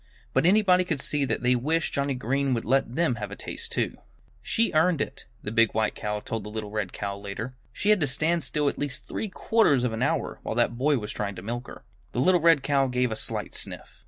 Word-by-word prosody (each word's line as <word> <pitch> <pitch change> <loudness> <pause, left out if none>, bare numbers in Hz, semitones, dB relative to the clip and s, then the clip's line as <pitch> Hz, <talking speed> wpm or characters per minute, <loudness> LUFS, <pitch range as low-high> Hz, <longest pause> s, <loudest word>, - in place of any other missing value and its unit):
But - - +3
anybody 185 -2 +5
could 160 -6 -2
see 145 +1 +1
that 130 - -1
they 125 +1 +4
wished 155 +7 0
Johnnie 140 -1 0
Green 130 +2 0
would 115 - -3
let 130 -1 +1
them 160 -7 +1
have 105 - -3
a - - -7
taste - - -6
too. - - -1 0.4
"She 230 +1 +1
earned 160 +1 +3
it," - - -4 0.2
the 105 - -4
big 115 -1 +3
white 110 0 +1
cow 105 -1 -3
told 115 +1 -4
the 105 - -7
little 105 -1 -5
red 105 -4 -2
cow, 100 -1 -4
later. 100 +5 -6 0.2
"She 200 - +1
had 210 - +5
to 145 - +2
stand 160 +5 0
still 145 +2 0
at - - -1
least 145 -2 -4
three 220 - -3
quarters 185 - +3
of 125 -3 0
an 110 - -3
hour, - - 0
while - - -4
that 120 - +2
boy 140 +4 +2
was 105 -2 -4
trying 100 -2 -3
to 90 - -8
milk 120 +3 -4
her." - - -11 0.3
The - - -1
little 180 +6 +4
red 165 -4 +5
cow 140 -1 +2
gave 125 -1 0
a - - -1
slight - - -3
sniff. - - -6
130 Hz, 245 wpm, -26 LUFS, 110-155 Hz, 0.4 s, anybody